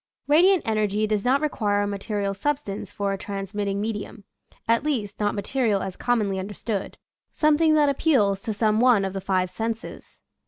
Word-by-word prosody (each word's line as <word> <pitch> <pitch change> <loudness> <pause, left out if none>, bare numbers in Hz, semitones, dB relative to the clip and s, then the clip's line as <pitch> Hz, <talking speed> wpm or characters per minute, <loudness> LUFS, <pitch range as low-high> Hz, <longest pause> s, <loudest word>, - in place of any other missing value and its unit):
Radiant 350 +5 +5
energy 215 -1 +1
does 210 -1 -1
not 265 +3 +2
require 205 -9 0
a - - -1
material 200 0 -2
substance 205 -4 -3
for 200 -1 -2
a 195 - -5
transmitting 200 0 -3
medium 210 -1 -4 0.2
— - - -32
at 230 +3 +2
least, 225 -9 -2
not 205 0 0
material 215 -2 0
as 190 -2 -5
commonly 210 -6 0
understood 205 +1 -4 0.2
— - - -56
something 310 +1 +4
that 300 -1 +4
appeals 255 -9 +2
to 220 - -3
some 215 0 +1
one 235 -5 +4
of 190 - -4
the 195 - -4
five 185 -1 0
senses. 225 +3 -6
210 Hz, 175 wpm, -24 LUFS, 200-250 Hz, 0.2 s, Radiant